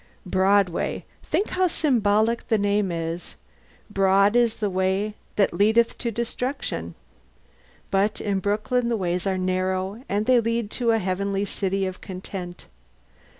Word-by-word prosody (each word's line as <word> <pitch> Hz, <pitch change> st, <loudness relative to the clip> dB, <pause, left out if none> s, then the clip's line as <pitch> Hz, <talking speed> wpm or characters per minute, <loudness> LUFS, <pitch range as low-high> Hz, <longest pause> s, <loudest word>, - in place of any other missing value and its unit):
Broadway: 190 Hz, -1 st, +1 dB, 0.2 s
think 410 Hz, -, -1 dB
how 370 Hz, 0 st, +2 dB
symbolic 230 Hz, -, +1 dB
the 220 Hz, -, +2 dB
name 205 Hz, -1 st, +1 dB
is. 165 Hz, +1 st, -4 dB, 0.5 s
Broad 195 Hz, +1 st, +3 dB
is 235 Hz, -2 st, +3 dB
the 210 Hz, -, -1 dB
way 190 Hz, +2 st, 0 dB, 0.2 s
that 200 Hz, -, +2 dB
leadeth 220 Hz, +3 st, +3 dB
to 235 Hz, -, -1 dB
destruction! 235 Hz, -, -3 dB, 1.0 s
But 200 Hz, +3 st, +1 dB
in 200 Hz, -2 st, -1 dB
Brooklyn 215 Hz, +5 st, 0 dB
the 230 Hz, -, +1 dB
ways 180 Hz, 0 st, -1 dB
are 190 Hz, -1 st, 0 dB
narrow, 185 Hz, +4 st, -1 dB
and 205 Hz, +2 st, 0 dB
they 255 Hz, 0 st, +5 dB
lead 230 Hz, -2 st, -1 dB
to 245 Hz, -, -2 dB
the 225 Hz, -1 st, +4 dB
Heavenly 195 Hz, 0 st, -1 dB
City 195 Hz, -1 st, -1 dB
of 185 Hz, 0 st, -5 dB
content. 185 Hz, -2 st, -7 dB
200 Hz, 140 wpm, -24 LUFS, 190-225 Hz, 1.0 s, they